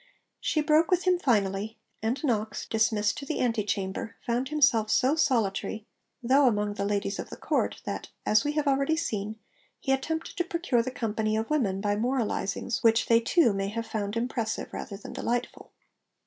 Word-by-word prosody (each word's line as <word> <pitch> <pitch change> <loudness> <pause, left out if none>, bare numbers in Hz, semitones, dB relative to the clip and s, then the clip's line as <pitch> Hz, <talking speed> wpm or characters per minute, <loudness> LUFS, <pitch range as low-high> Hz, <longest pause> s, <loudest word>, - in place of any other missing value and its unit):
She 310 - +1
broke 305 +2 +3
with 360 -1 +2
him 365 -1 +3
finally; 210 - 0 0.2
and 230 +7 -1
Knox, 220 -6 -1
dismissed 220 -2 +1
to 280 - -7
the - - -2
ante 230 -4 +1
chamber, 195 +1 -3
found 245 +2 0
himself 270 -8 +3
so 265 +6 +3
solitary, 220 -7 0 0.4
though 265 +3 +5
among 210 -3 +1
the 200 - -2
ladies 200 -1 -1
of - - -5
the - - -8
Court, - - -1
that - - -4 0.2
(as 215 +3 +4
we 295 0 -1
have 300 0 0
already 275 +3 +2
seen) 215 -8 -2 0.4
he 270 - -1
attempted 320 +7 -2
to 350 - +2
'procure 335 -8 0
the 245 - -3
company 220 -3 -1
of 225 +5 -3
women' 200 -11 +1
by 205 0 +1
moralisings 235 -2 -1
which 225 -1 +4
they 230 0 +5
too 235 - +3
may 195 0 -1
have 230 +3 -3
found 210 0 -3
impressive 230 -2 -2
rather 200 - -6
than 200 - -9
delightful. 245 +1 -3
230 Hz, 180 wpm, -28 LUFS, 210-270 Hz, 0.4 s, though